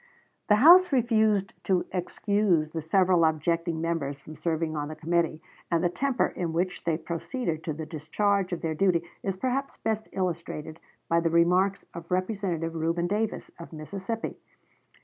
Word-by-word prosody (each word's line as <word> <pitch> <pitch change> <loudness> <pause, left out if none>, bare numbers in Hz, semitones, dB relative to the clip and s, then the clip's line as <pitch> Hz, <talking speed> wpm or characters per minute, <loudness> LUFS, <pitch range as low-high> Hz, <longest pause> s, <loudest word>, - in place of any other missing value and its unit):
The 210 - +6
House 350 - +8
refused 220 -6 +2
to 185 -2 +2
excuse 185 -3 +1
the 160 - -3
several 180 +1 +3
objecting 165 +1 +1
members 160 -4 -2
from 155 +2 -11
serving 160 0 -1
on 145 -1 -2
the 155 - -6
committee; 165 -1 0 0.3
and 170 0 +1
the 175 - +3
temper 270 +7 +1
in 170 -3 -3
which 180 +2 -2
they 165 -2 +1
proceeded 170 - -3
to 155 - -1
the 160 +1 -6
discharge 185 +5 0
of 175 - -3
their 160 -1 -1
duty 175 0 +2 0.2
is 195 -1 -2
perhaps 260 +5 -2
best 220 -1 -2
illustrated 165 -3 -4 0.3
by 170 - +3
the 165 0 +1
remarks 180 +4 +3
of 170 -1 -9
Representative 185 -3 -1
Reuben 165 +1 0
Davis, 210 +4 -2
of 170 - -9
Mississippi. 195 +8 -5
170 Hz, 160 wpm, -27 LUFS, 160-200 Hz, 0.3 s, House